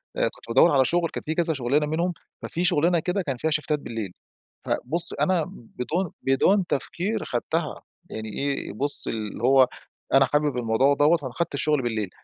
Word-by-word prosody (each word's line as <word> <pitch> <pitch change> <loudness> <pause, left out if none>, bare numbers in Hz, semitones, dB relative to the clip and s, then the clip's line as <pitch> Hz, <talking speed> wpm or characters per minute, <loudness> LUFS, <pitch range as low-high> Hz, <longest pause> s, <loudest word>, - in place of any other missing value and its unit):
كنت - - -2
بادور 140 +8 +5
على 135 -2 +4
شغل 170 +2 +1
كان - - -6
في 160 +1 -2
كذا 170 -2 +1
شغلانة 140 +3 +1
منهم 170 +4 -1 0.3
ففي 175 +2 -2
شغلانه 170 +2 +3
كده 185 +3 -1
كان 135 -7 -3
فيها 160 +5 -1
شيفتات 150 0 0
بالليل 115 -7 -5 0.5
فبُص 165 +7 0
أنا 180 -4 +1
بدون 155 +9 -4
بدون 180 +9 +3
تفكير 180 +9 -2
خدتها 155 +6 -2 0.3
يعني 110 0 -5
إيه، 140 -4 -2
بُص 140 +6 0
اللي 110 0 -4
هو 130 0 +6 0.5
أنا 135 0 +6
حابب 145 -1 0
الموضوع 120 +4 +3
دوّة، 150 +4 +4
فأنا 130 -5 -7
أخدت 170 +3 -3
الشغل 150 -1 +1
بالليل 110 -5 -2
145 Hz, 170 wpm, -25 LUFS, 125-170 Hz, 0.5 s, هو